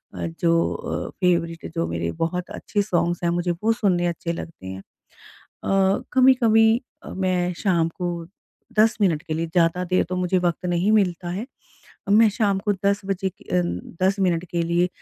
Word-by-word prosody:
अ, - - -3
जो 170 0 +2
अ, - - -4
फ़ेवरेट 170 -2 0
जो 165 - 0
मेरे 85 0 -2
बहुत 180 +2 -2
अच्छे 205 - -2
सॉन्ग्स 175 -3 0
हैं 170 - +2
मुझे 175 0 0
वो 225 - +4
सुनने 185 -6 +1
अच्छे 170 0 -3
लगते 165 - -8
हैं। 95 0 -6
अ, - - -13 1.3
कभी-कभी 235 -3 +5 0.2
अ, - - -8
मैं 185 -1 0
शाम 170 -4 +2
को 170 -1 -4 0.5
10 220 +1 +5
मिनट 170 -7 +2
के 155 - -4
लिए 165 +1 -1
ज़्यादा 165 +1 +1
देर 185 +1 +1
तो 185 - -2
मुझे 180 0 +1
वक़्त 175 -1 -1
नहीं 175 +4 +1
मिलता 180 -4 +1
है, 195 +7 -4 0.6
मैं 220 +2 +6
शाम 205 -2 +1
को - - +5
10 200 0 +2
बजे 195 -1 -1
क 185 - -22
अ, 180 0 +3 0.4
10 195 +2 +2
मिनट 175 -2 +1
के 170 -1 0
लिए 170 +2 +1
180 Hz, 180 wpm, -23 LUFS, 170-200 Hz, 1.3 s, मैं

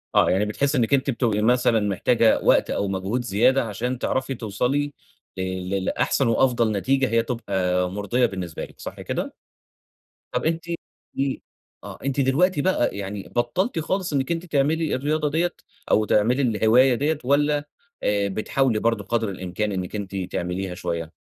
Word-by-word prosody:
آه، - - +5
يعني 95 +3 +2
بتحسِّي 140 +7 0
إنك 120 +2 +1
أنتِ 135 0 +2
بتبقي 115 -4 +1
مثلًا 120 0 +3
محتاجة 110 +3 +2
وقت - - +4
أو 100 - -1
مجهود 95 +5 -2
زيادة 120 +5 +3
عشان 120 +4 -3
تعرفي 130 +1 -1
توصلي 125 +7 -1 0.4
ل - - -2 0.3
ل 95 -1 -1
لأحسن 135 - +1
وأفضل 115 -1 +2
نتيجة 130 +6 +1
هي 115 0 +2
تبقى 95 -6 -1
مرضية 105 +5 +1
بالنسبة 95 -7 -4
لِك، - - -19
صح - - -7
كده؟ - - -4 1.0
طب - - -2
أنتِ 165 +1 0
قولي 170 0 -2 0.4
لي 135 -1 -1 0.4
آه، - - -8
أنتِ 140 0 -1
دلوقتي 145 +5 +3
بقى 140 - +1
يعني 100 0 -5
بطّلتِ 165 - 0
خالص 180 +1 -2
إنك 140 +4 0
أنتِ 170 +1 -2
تعملي 155 +1 +1
الرياضة 150 +3 0
دِيَّة، 175 +3 +1 0.4
أو 110 - +4
تعملي 115 +6 +2
الهواية 120 +2 +4
دِيَّة، 150 +5 0
والَّا 145 +2 +2 0.4
آآ، 100 -1 +1
بتحاولي 110 +4 0
برضه 115 -2 0
قدر 115 +1 -1
الإمكان 95 +3 -3
إنك 95 0 -4
أنتِ 100 -1 -5
تعمليها 90 0 -3
شويّة؟ 85 -2 -4
120 Hz, 160 wpm, -24 LUFS, 100-140 Hz, 1.0 s, آه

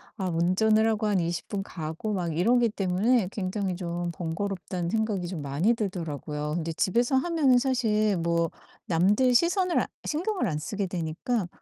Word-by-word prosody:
아 190 -4 -3
운전을 195 +6 +3
하고 215 -1 +1
한 200 -3 +2
20 170 0 -2
분 195 -1 -2
가고 165 +5 -4
막 170 -4 -2
이러기 235 +6 +3
때문에 200 +2 +1
굉장히 190 -1 -2
좀 175 -1 -3
번거롭다는 175 0 -3
생각이 210 -5 -1
좀 175 -4 -5
많이 145 +11 +1
들더라고요. 155 - -3
근데 165 -1 -2
집에서 235 - +1
하면은 290 -4 +3
사실 225 -5 +2
뭐 170 0 0 0.3
남들 205 +9 +3
시선을 360 +3 +3
아 - - -2 0.2
신경을 355 - -1
안 155 -5 -1
쓰게 200 +5 -3
되니까 175 +5 -2
195 Hz, 325 characters per minute, -27 LUFS, 170-225 Hz, 0.3 s, 운전을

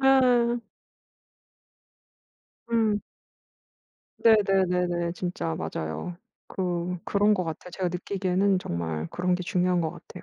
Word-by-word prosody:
아. 250 -3 +4 2.1
응. 220 -3 +2 1.2
네네네네. 180 -5 +3
진짜 175 - -3
맞아요. 80 - -4 0.3
그 180 -1 -2
그런 205 +1 +3
것 185 - 0
같아요. 165 +2 -6
제가 185 -1 -1
느끼기에는 190 +2 +1
정말 80 - -3
그런 180 0 0
게 180 - -2
중요한 180 0 +1
것 160 -1 -1
같아요. - - -12
180 Hz, 215 characters per minute, -27 LUFS, 175-205 Hz, 2.1 s, 아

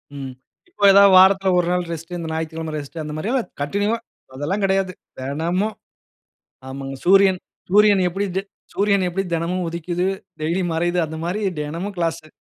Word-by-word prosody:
ம், 135 -2 -6 0.4
இப்ப 350 - 0
ஏதாவது 200 0 +7
வாரத்துல 190 +1 +6
ஒரு 175 - 0
நாள் 180 0 0
ரெஸ்ட்டு, 165 +2 -6
இந்த 165 - -5
ஞாயித்திக்கிழம 160 0 -4
ரெஸ்ட்டு 150 +3 -7
அந்த 150 0 -6
மாதிரியா? 220 +11 -1 0.3
கன்டின்யூவா, 205 +9 0 0.4
அதெல்லாம் 155 +10 -2
கெடயாது. 190 -1 +1 0.3
தினமும். 170 +10 -1 0.9
ஆமாங்க, 135 0 -6
சூரியன் 195 0 +5 0.3
சூரியன் 205 -1 +5
எப்பிடி 195 +3 -2 0.5
சூரியன் 200 -1 +2
எப்பிடி 195 +2 -2
தினமும் 170 +2 -1
உதிக்குது, 170 +2 -2 0.3
டெய்லியும் 170 +3 -1
மறையுது? 175 +2 0
அந்த 160 +1 -7
மாரி 185 +5 -2 0.2
தினமும் 170 +7 -4
கிளாஸு. 165 -2 -2
175 Hz, 145 wpm, -21 LUFS, 160-195 Hz, 0.9 s, ஏதாவது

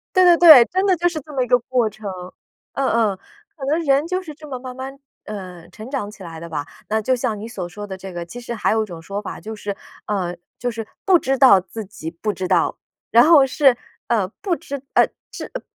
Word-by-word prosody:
对 370 0 +6
对 350 -1 +7
对， 315 -9 +10
真 375 +6 0
的 375 -2 +4
就 345 +2 +2
是 330 -3 -4
这 300 +2 -13
么 265 -2 0
一 245 - -1
个 245 - +4
过 245 -1 0
程， 210 -1 -7 0.6
嗯 270 -1 0
嗯。 215 -4 +1 0.4
可 270 -4 -6
能 310 +4 +1
人 280 +2 +3
就 370 +2 -2
是 315 - -8
这 310 -1 -12
么 260 -3 -6
慢 255 -1 -7
慢， 270 +1 -7 0.3
呃， 185 -5 -8
成 220 +4 -10
长 260 -7 -3
起 200 -2 -13
来 165 -2 -8
的 170 +1 -8
吧。 145 -3 -3 0.3
那 220 +1 +1
就 255 +4 +1
像 225 -3 -1
你 225 - -6
所 190 -7 -5
说 205 +4 -8
的 190 -1 -6
这 190 0 -9
个， 175 -1 -5
其 240 +8 -9
实 240 0 -5
还 220 - 0
有 220 0 +2
一 - - -10
种 170 -4 -9
说 200 +5 -4
法， 205 - -7
就 220 +1 -7
是， 205 -1 -5 0.3
呃， 185 -4 -2 0.2
就 245 - -1
是 225 -2 -6 0.2
不 380 -4 +5
知 270 -3 0
道 255 -8 +7
自 215 +4 -8
己 190 -5 -8
不 170 +6 -3
知 185 -1 -4
道， - - +1 0.3
然 235 +3 +6
后 315 -4 +7
是， 270 -1 +3 0.3
呃， 215 -6 +1
不 390 -4 0
知， 280 -4 -6
呃， - - +5 0.2
知 - - -7
呃， - - -4
235 Hz, 265 characters per minute, -21 LUFS, 200-275 Hz, 0.6 s, 对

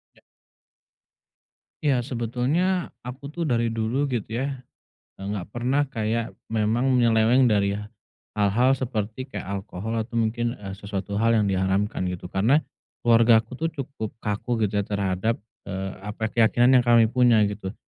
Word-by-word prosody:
Ya. - - -23 1.6
Ya, 140 -4 +3
sebetulnya 135 +10 -1
aku 140 +4 -8
tuh 175 - -5
dari 115 -6 +1
dulu 115 +6 0
gitu 115 -3 -3
ya, 135 -1 -3 0.6
eee, 95 - -8
enggak 100 -2 -4
pernah 125 +5 0
kayak 115 0 -2 0.2
memang 110 +3 +1 0.2
nyeleweng 115 +2 +4
dari 100 -1 +2
h 105 - -4 0.6
hal-hal 120 +6 +3
seperti 115 -1 -3
kayak 130 - -7
alkohol 100 +3 -4
atau 115 +2 -4
mungkin, 115 +1 0
eee, 100 -5 -8
sesuatu 100 -1 -4
hal 115 +1 +3
yang 105 -3 +2
diharamkan, 95 +1 0
gitu. 90 0 -5
Karena 115 +12 +3 0.4
keluargaku 115 +1 +4
tuh 165 -1 -2
cukup 135 -7 -6
kaku 110 +2 -2
gitu 105 - -2
ya 100 - 0
terhadap, 100 +2 -1 0.2
eee, 95 0 -4 0.2
apa, 110 +1 -3
keyakinan 120 +3 +4
yang 125 - +2
kami 115 -2 +5
punya, 120 -3 +4
gitu. 100 -1 -6
115 Hz, 150 wpm, -25 LUFS, 105-125 Hz, 1.6 s, kami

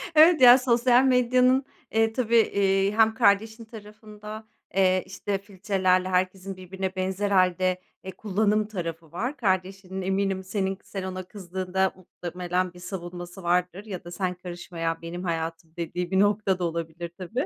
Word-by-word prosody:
Evet 315 0 +7
ya, 245 0 +10
sosyal 245 0 +4
medyanın, 255 +1 +3 0.3
eee, 225 0 +2
tabii, 235 -1 0
eee, 195 -2 +2
hem 220 +1 +4
kardeşin 220 +2 +2
tarafında, 215 0 -11 0.3
eee, 185 -1 +3
işte 195 +1 -3
filtrelerle 190 -2 0
herkesin 185 +1 -1
birbirine 190 +1 -5
benzer 190 +2 -1
hâlde 185 -1 +2 0.2
e, 190 - -6
kullanım 210 +2 0
tarafı 165 -5 -6
var, 245 - -3
kardeşinin 190 -1 -2
eminim 190 0 -1
senin 190 0 -2
sen 195 -2 -6
ona 185 0 -5
kızdığında 190 -1 -2
muhtemelen 180 0 -4
bir 180 - -13
savunması 175 0 -7
vardır 180 +3 0
ya 190 -5 -6
da 175 - -10
"sen 180 0 -2
karışma 175 -1 -9
ya, 165 0 -1
benim 175 +2 -6
hayatım" 165 -1 -4
dediği 175 +1 -3
bir 190 - +3
nokta 205 -2 +2
da - - -2
olabilir 170 0 -4
tabii. 220 - -3
190 Hz, 150 wpm, -26 LUFS, 180-210 Hz, 0.3 s, ya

